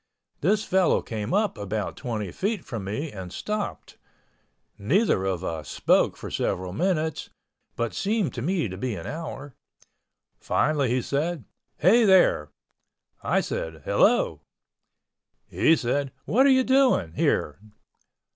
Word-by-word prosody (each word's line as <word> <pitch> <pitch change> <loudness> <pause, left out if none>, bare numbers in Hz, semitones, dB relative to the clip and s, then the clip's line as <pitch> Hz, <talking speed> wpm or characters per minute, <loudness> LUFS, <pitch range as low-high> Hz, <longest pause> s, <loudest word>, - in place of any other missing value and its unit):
This 205 +6 +2
fellow 185 -4 +2
came 110 0 -4
up 205 - +1
about 105 +1 -3
twenty 110 -7 -4
feet 200 - -2
from 110 -5 -5
me 140 +10 -4
and 95 -3 -8
stopped—neither 160 - -3
of 95 -2 -2
us 80 -6 -4
spoke - - +2
for - - -8
several 90 0 -2
minutes 160 - -1 0.5
(but 115 -1 -2
seemed 200 - -1
to 120 - -5
me 170 -1 0
to 95 -1 -7
be 120 +1 -3
an 85 - -7
hour)—finally 145 -1 -4
he 125 0 0
said, 155 +1 -2 0.3
"Hey, 220 +8 +5
there." 185 - +4 0.7
I - - +1
said, 80 -2 -5
"Hello." - - +2 1.0
He 165 - +3
said, 135 +1 -1
"What 265 +6 +4
are - - +5
you 260 -1 +5
doing 260 - +3
here?" 75 -1 0
140 Hz, 125 wpm, -25 LUFS, -, 1.0 s, Hey